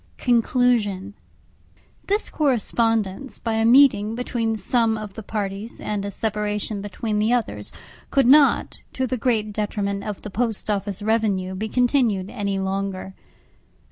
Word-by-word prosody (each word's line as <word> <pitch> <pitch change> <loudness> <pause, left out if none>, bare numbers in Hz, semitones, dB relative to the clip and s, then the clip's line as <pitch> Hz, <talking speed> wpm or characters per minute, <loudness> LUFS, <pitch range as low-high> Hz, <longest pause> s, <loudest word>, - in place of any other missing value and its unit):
CONCLUSION 230 -5 +1 0.9
This 410 +2 0
correspondence, 230 -4 0
by 225 - -3
a 225 0 +1
meeting 230 -4 +5
between 230 -2 -1
some 225 +2 +1
of 210 -2 -7
the 220 - -7
parties, 205 +1 -4
and 205 -2 -3
a 200 - -3
separation 210 0 -2
between 210 +1 -3
the 215 +2 +2
others, 245 -2 -1 0.4
could 275 -2 +3
not, 280 +3 +4
to 260 - -1
the 255 - -2
great 220 -4 0
detriment 200 -1 -2
of 210 -2 -6
the 210 - -7
Post 225 0 -1
Office 200 -1 -3
revenue, 205 -4 0
be 215 +4 -4
continued 240 -7 +1
any 200 -4 -2
longer. 190 0 -3
215 Hz, 140 wpm, -23 LUFS, 200-240 Hz, 0.9 s, meeting